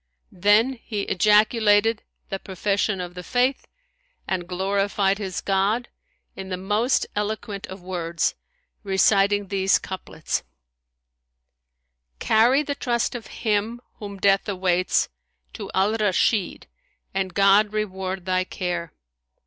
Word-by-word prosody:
Then 215 Hz, +7 st, +3 dB
he 210 Hz, -2 st, -3 dB
ejaculated 210 Hz, +2 st, +3 dB, 0.3 s
the 195 Hz, -, -3 dB
profession 195 Hz, +1 st, -1 dB
of 180 Hz, -1 st, -5 dB
the 180 Hz, -, -7 dB
Faith 250 Hz, +8 st, 0 dB, 0.6 s
and 180 Hz, -2 st, -2 dB
glorified 195 Hz, +2 st, 0 dB
his 190 Hz, -3 st, -4 dB
God 200 Hz, +5 st, 0 dB, 0.5 s
in 190 Hz, 0 st, -7 dB
the 185 Hz, -, -3 dB
most 210 Hz, +7 st, +1 dB
eloquent 210 Hz, -1 st, -3 dB
of 190 Hz, -1 st, -10 dB
words, 170 Hz, -2 st, -1 dB, 0.5 s
reciting 200 Hz, 0 st, +2 dB
these 195 Hz, -1 st, +3 dB
couplets, 185 Hz, -4 st, -4 dB, 1.8 s
Carry 240 Hz, -, +3 dB
the 285 Hz, -, -2 dB
trust 240 Hz, -4 st, -1 dB
of 240 Hz, -3 st, -7 dB
him 220 Hz, +1 st, -1 dB, 0.2 s
whom 200 Hz, -2 st, -7 dB
death 195 Hz, +1 st, +2 dB
awaits 185 Hz, -2 st, +1 dB, 0.2 s
* 60 Hz, 0 st, -45 dB
To -, -, -7 dB
Al 195 Hz, +3 st, +2 dB
Rashid 210 Hz, -1 st, +1 dB, 0.5 s
and 190 Hz, -2 st, -2 dB
God 200 Hz, +1 st, +5 dB
reward 190 Hz, -3 st, -3 dB
thy 185 Hz, 0 st, +1 dB
care! 175 Hz, -3 st, -4 dB
200 Hz, 115 wpm, -24 LUFS, 185-215 Hz, 1.8 s, God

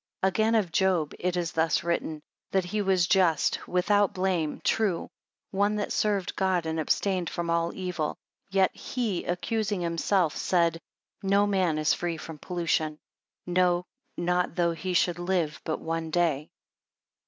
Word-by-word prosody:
20 190 Hz, -, +4 dB
Again 220 Hz, +3 st, +2 dB
of 200 Hz, -6 st, +1 dB
Job, 180 Hz, -4 st, +2 dB
it 180 Hz, 0 st, -1 dB
is 170 Hz, -2 st, -1 dB
thus 160 Hz, 0 st, +1 dB
written, 160 Hz, -2 st, -2 dB, 0.3 s
That 190 Hz, -2 st, +1 dB
he 210 Hz, +4 st, -1 dB
was 190 Hz, -3 st, +3 dB
just, 175 Hz, -4 st, +3 dB
and -, -, -12 dB
without 200 Hz, +2 st, +2 dB
blame, 185 Hz, -5 st, 0 dB
true; 205 Hz, -6 st, 0 dB, 0.4 s
one 205 Hz, +2 st, +1 dB
that 210 Hz, -1 st, -2 dB
served 205 Hz, -4 st, 0 dB
God, 185 Hz, -3 st, +1 dB
and 160 Hz, 0 st, -2 dB
abstained 180 Hz, +2 st, 0 dB
from 170 Hz, -1 st, -2 dB
all 170 Hz, 0 st, +1 dB
evil. 180 Hz, -5 st, -3 dB, 0.3 s
Yet 190 Hz, -1 st, +2 dB
he 225 Hz, -8 st, -2 dB
accusing 205 Hz, +2 st, -1 dB
himself, 170 Hz, 0 st, +1 dB
said, 170 Hz, -2 st, +1 dB, 0.4 s
No 200 Hz, +1 st, +3 dB
man 185 Hz, -6 st, +1 dB
is 155 Hz, 0 st, +3 dB
free 170 Hz, -2 st, -2 dB
from 160 Hz, -1 st, -8 dB
pollution, 165 Hz, -3 st, -1 dB, 0.5 s
no, 180 Hz, 0 st, +2 dB, 0.3 s
not 180 Hz, 0 st, 0 dB
though 170 Hz, -1 st, +2 dB
he 180 Hz, +3 st, -3 dB
should 175 Hz, 0 st, +2 dB
live 175 Hz, -4 st, -1 dB
but 155 Hz, -, -2 dB
one 165 Hz, 0 st, -3 dB
day. 155 Hz, -3 st, +1 dB
175 Hz, 155 wpm, -27 LUFS, 165-190 Hz, 0.5 s, 20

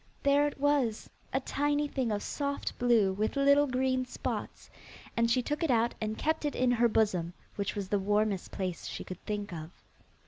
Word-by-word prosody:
There 285 Hz, +1 st, +4 dB
it 290 Hz, -, -6 dB
was, 280 Hz, -6 st, +1 dB, 0.2 s
a 265 Hz, -, +1 dB
tiny 290 Hz, +2 st, 0 dB
thing 260 Hz, -5 st, -1 dB
of 205 Hz, -1 st, -1 dB
soft 280 Hz, -1 st, -3 dB
blue 230 Hz, -6 st, +4 dB
with 215 Hz, +6 st, -1 dB
little 280 Hz, +1 st, +5 dB
green 255 Hz, 0 st, +1 dB
spots, 250 Hz, -, -5 dB, 0.5 s
and 230 Hz, 0 st, +2 dB
she 250 Hz, +2 st, +2 dB
took 295 Hz, +3 st, -2 dB
it 330 Hz, -, +1 dB
out 235 Hz, -1 st, +3 dB
and 215 Hz, 0 st, -2 dB
kept 315 Hz, 0 st, 0 dB
it 295 Hz, -, -1 dB
in 250 Hz, -1 st, +2 dB
her 240 Hz, 0 st, +4 dB
bosom, 190 Hz, -6 st, +1 dB, 0.2 s
which 200 Hz, +1 st, -2 dB
was 200 Hz, -2 st, -3 dB
the 205 Hz, -, +2 dB
warmest 205 Hz, -1 st, +1 dB
place 185 Hz, -3 st, -4 dB
she -, -, -5 dB
could 185 Hz, -1 st, -9 dB
think 205 Hz, -3 st, -3 dB
of. 160 Hz, -1 st, -6 dB
235 Hz, 195 wpm, -30 LUFS, 205-280 Hz, 0.5 s, little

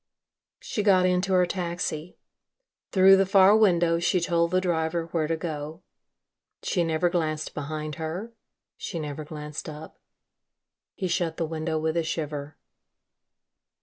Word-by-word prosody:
She 215 Hz, -, -3 dB
got 190 Hz, -3 st, +4 dB
into 180 Hz, +1 st, +1 dB
her 180 Hz, -1 st, +5 dB
taxi. 175 Hz, -2 st, -4 dB, 0.7 s
Through 195 Hz, 0 st, +7 dB
the 195 Hz, -, +3 dB
far 195 Hz, +1 st, +6 dB
window 175 Hz, -6 st, +3 dB
she 180 Hz, +1 st, +2 dB
told 170 Hz, 0 st, +1 dB
the 185 Hz, +1 st, +2 dB
driver 165 Hz, -2 st, -1 dB
where 160 Hz, -3 st, 0 dB
to 165 Hz, 0 st, -1 dB
go. 155 Hz, 0 st, -6 dB, 0.8 s
She 175 Hz, -, 0 dB
never 165 Hz, +1 st, +1 dB
glanced 155 Hz, -3 st, -2 dB
behind 155 Hz, +1 st, -5 dB
her, 180 Hz, +9 st, -5 dB, 0.4 s
she 175 Hz, -, -5 dB
never 150 Hz, 0 st, -5 dB
glanced 150 Hz, 0 st, -7 dB
up. 155 Hz, +1 st, -10 dB, 1.0 s
He 190 Hz, -, -2 dB
shut 170 Hz, -2 st, -1 dB
the 165 Hz, -, -1 dB
window 160 Hz, 0 st, -3 dB
with 160 Hz, +1 st, -1 dB
a 170 Hz, -, +1 dB
shiver. 150 Hz, -2 st, -4 dB
170 Hz, 140 wpm, -26 LUFS, 155-180 Hz, 1.0 s, Through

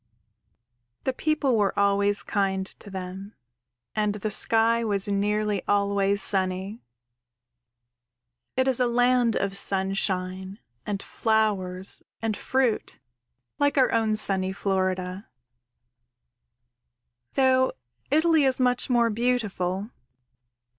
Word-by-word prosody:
_ -, -, -39 dB
_The 265 Hz, -, -1 dB
people 300 Hz, -5 st, 0 dB
were 205 Hz, -2 st, 0 dB
always 200 Hz, 0 st, +2 dB
kind 190 Hz, -2 st, -1 dB
to 205 Hz, -, -12 dB
them 190 Hz, +2 st, -8 dB, 0.6 s
and 210 Hz, -1 st, 0 dB
the 210 Hz, +1 st, -4 dB
sky 230 Hz, +2 st, +3 dB
was 200 Hz, -3 st, 0 dB
nearly 205 Hz, 0 st, 0 dB
always 200 Hz, 0 st, +1 dB
sunny. 190 Hz, +3 st, -1 dB, 1.8 s
It 260 Hz, 0 st, +2 dB
is 260 Hz, -2 st, +4 dB
a 250 Hz, -, +2 dB
land 245 Hz, -1 st, +2 dB
of 195 Hz, 0 st, -1 dB
sunshine 190 Hz, -1 st, +1 dB, 0.3 s
and 200 Hz, -1 st, -3 dB
flowers 200 Hz, -4 st, +1 dB, 0.2 s
and 225 Hz, -2 st, -2 dB
fruit, 260 Hz, -2 st, -1 dB, 0.6 s
like 285 Hz, 0 st, +1 dB
our 260 Hz, -, +4 dB
own 220 Hz, -2 st, +1 dB
sunny 190 Hz, -3 st, 0 dB
Florida, 185 Hz, 0 st, -2 dB, 2.1 s
though 260 Hz, -1 st, +3 dB, 0.4 s
Italy 315 Hz, +1 st, +3 dB
is 260 Hz, -1 st, +1 dB
much 250 Hz, 0 st, +1 dB
more 235 Hz, -2 st, +2 dB
beautiful. 210 Hz, -4 st, -2 dB
205 Hz, 105 wpm, -25 LUFS, 195-240 Hz, 2.1 s, is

